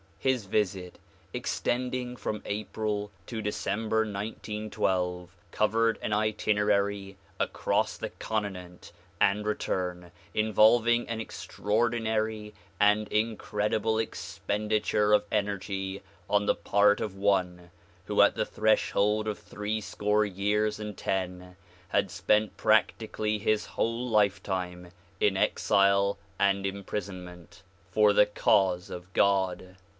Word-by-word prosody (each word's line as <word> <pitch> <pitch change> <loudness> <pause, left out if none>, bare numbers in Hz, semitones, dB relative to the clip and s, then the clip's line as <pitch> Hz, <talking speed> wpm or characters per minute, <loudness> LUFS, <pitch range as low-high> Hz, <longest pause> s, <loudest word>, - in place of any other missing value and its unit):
His 130 -5 0
visit 95 -3 -1 0.3
extending 125 0 -2
from 105 -3 -4
April 105 0 -3
to 110 +2 -5
December 105 +1 -1
1912 100 -4 -2 0.2
covered 115 +1 +2
an 105 - -1
itinerary 105 -2 0 0.2
across - - 0
the - - -4
continent 95 -5 -5 0.3
and 105 +2 +2
return, 90 -4 -2 0.2
involving 110 +2 +4
an 115 -1 -3
extraordinary 110 -1 -1 0.3
and 105 +1 +4
incredible 105 0 0
expenditure 105 -1 -1
of 105 0 +4
energy 100 -2 -2 0.3
on 105 0 +2
the - - +3
part 105 0 +3
of 100 -3 -4
one 90 -3 0 0.4
who - - +3
at - - +4
the - - 0
threshold 105 0 +1
of 105 - -2
three 105 +1 -4
score 105 +1 +1
years 105 +2 0
and 105 -2 -6
ten 90 -1 -3 0.3
had 100 -1 +1
spent 105 -1 +1
practically 105 0 +1
his 105 +1 +1
whole 115 +2 -2
lifetime 95 -4 0 0.3
in 100 -2 +3
exile 100 +1 +3 0.2
and 100 0 +2
imprisonment 90 -3 -6 0.3
for 105 +1 +5
the 105 - +6
cause 95 -3 +2
of 90 +1 -8
God. 95 -2 +1
105 Hz, 110 wpm, -28 LUFS, 95-110 Hz, 0.4 s, the